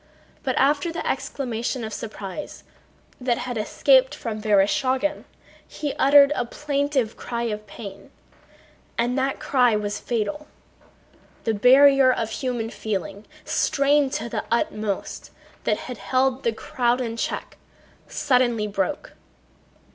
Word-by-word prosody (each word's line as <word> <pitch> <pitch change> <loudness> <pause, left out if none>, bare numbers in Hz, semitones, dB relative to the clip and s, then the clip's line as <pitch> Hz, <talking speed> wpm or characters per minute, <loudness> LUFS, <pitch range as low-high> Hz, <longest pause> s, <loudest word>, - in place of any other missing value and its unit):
But 260 -2 -1
after 290 +4 +2
the 330 - -4
exclamation 245 -1 -2
of 220 -1 -5
surprise 215 +4 -7 0.6
that 250 -2 0
had 250 -1 -4
escaped 260 +5 +3
from 220 -6 -5
Vereshchágin 255 +8 +1 0.4
he 290 -2 -4
uttered 280 +1 +7
a - - 0
plaintive 280 -2 -1
cry 235 -1 -4
of 210 -2 -4
pain, 200 -1 -10 0.9
and 240 +1 +1
that 270 0 -1
cry 250 -4 +3
was 210 0 -2
fatal. 245 +6 -3 1.0
The 225 - 0
barrier 265 +4 +6
of 225 -3 -2
human 240 -2 -3
feeling, 200 -1 -4 0.2
strained 280 -1 +2
to 225 - -2
the - - -3
utmost, 215 -3 -2 0.4
that 210 - +1
had 250 -4 -7
held 255 +6 +1
the 230 - +1
crowd 240 +2 0
in 230 -3 -3
check 230 - -4 0.5
suddenly 250 -6 +1
broke. 205 +7 -3
245 Hz, 125 wpm, -24 LUFS, 220-275 Hz, 1.0 s, uttered